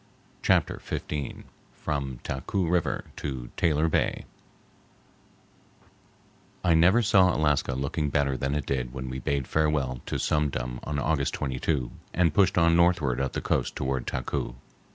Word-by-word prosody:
Chapter - - +2
XV 75 -3 -4 0.3
From 70 -4 -3
Taku 85 +7 -2
River 85 0 0
to 65 -4 -5
Taylor 80 0 +2
Bay 80 - 0 2.4
I 90 -2 +4
never 90 +9 +5
saw 95 -3 +5
Alaska 75 -4 +1
looking 70 +3 -1
better 70 -1 +1
than 70 +2 -1
it 75 -3 -2
did 65 -2 -2
when 65 -1 -5
we 65 - -4
bade 70 0 -1
farewell 75 -5 0
to - - -1
Sum 75 -1 +1
Dum 60 -2 -4
on 75 - -2
August 70 -2 0
22 65 -1 -1 0.2
and 85 -4 +3
pushed 95 +1 +3
on 85 -1 +5
northward 85 -8 +3
up 70 - -2
the - - -2
coast - - 0
toward 65 -2 -2
Taku. - - -3
70 Hz, 145 wpm, -27 LUFS, 65-80 Hz, 2.4 s, never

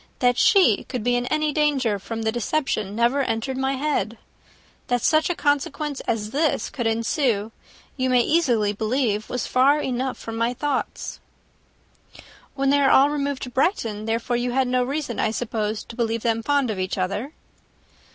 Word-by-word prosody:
That 245 -1 +2
she 365 - +5
could 250 -4 -4
be 245 +1 +2
in 245 0 -1
any 305 0 +1
danger 275 -9 +1
from 225 +3 -5
the 220 - +1
deception 230 -4 -1
never 240 +5 +2
entered 255 +1 -2
my 265 +1 0
head. 270 -5 -1 0.7
That 245 -1 0
such 310 +1 +3
a 355 - 0
consequence 290 -1 -1
as 215 -2 -1
this 300 +3 0
should 240 -4 -1
ensue, 225 -1 0 0.5
you 260 -1 0
may 250 -1 +4
easily 240 -9 +2
believe 220 0 -1
was 250 - -2
far 275 +4 +3
enough 260 -1 -2
from 225 0 -7
my 235 +2 0
thoughts." 280 +1 -3 1.4
"When 275 0 +1
they 285 0 +4
all 275 +1 +5
removed 285 -2 -2
to 250 - -6
Brighton, 230 - 0
therefore, 230 +2 -1
you 245 0 -2
had 265 0 +2
no 250 0 +1
reason, 275 -2 -3
I - - +2
suppose, 215 -2 -2
to 230 - -11
believe 230 -1 -1
them 230 -1 +1
fond 280 -1 +1
of 200 - -4
each 185 +1 -2
other?" 200 +10 -2
245 Hz, 170 wpm, -23 LUFS, 225-280 Hz, 1.4 s, she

